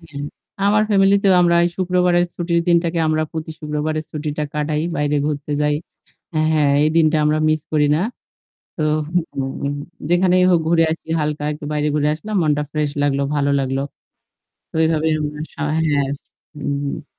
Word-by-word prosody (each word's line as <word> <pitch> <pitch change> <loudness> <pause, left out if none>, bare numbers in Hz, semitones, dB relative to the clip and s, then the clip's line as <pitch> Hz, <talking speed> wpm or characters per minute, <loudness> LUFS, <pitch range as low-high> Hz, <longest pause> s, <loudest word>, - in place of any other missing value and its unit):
হ্যাঁ, 155 -4 -9 0.4
আমার 210 +1 +4
ফ্যামিলিতেও 195 0 +4
আমরা 170 0 +3
এই - - +2
শুক্রবারের 180 -1 +2
ছুটির 170 -1 0
দিনটাকে 170 0 +2
আমরা 155 0 +1
প্রতি 160 0 -5
শুক্রবারের 155 0 -2
ছুটিটা 150 0 -4
কাটাই। 150 0 -1
বাইরে 145 0 0
ঘুরতে 150 -1 -3
যাই। 150 0 +2 0.8
হ্যাঁ 150 -2 +3
এই 155 - +2
দিনটা 155 -1 +4
আমরা 150 +1 +2
মিস 155 0 +2
করি 150 -1 +3
না। - - 0 0.8
তো 155 - -2 0.5
হুম 135 +1 -3 0.3
যেখানেই 180 +1 +3
হোক 175 -2 +4
ঘুরে 165 0 +4
আসি 165 - -9
হালকা 150 0 -2
একটু 150 0 -8
বাইরে 150 0 0
ঘুরে 150 0 +2
আসলাম, 210 +7 -7
মনটা 150 -1 +1
ফ্রেশ 150 -2 0
লাগলো, 140 -1 +1
ভালো 145 -1 +1
লাগলো। 135 0 -1 0.9
তো - - -63
ওইভাবে 160 -1 +2
আমরা 150 0 -4
স - - -23
হ্যাঁ, 155 - -1 0.8
হুম, 145 -1 -2
হুম। 145 +2 -4
155 Hz, 160 wpm, -20 LUFS, 150-170 Hz, 0.9 s, আমার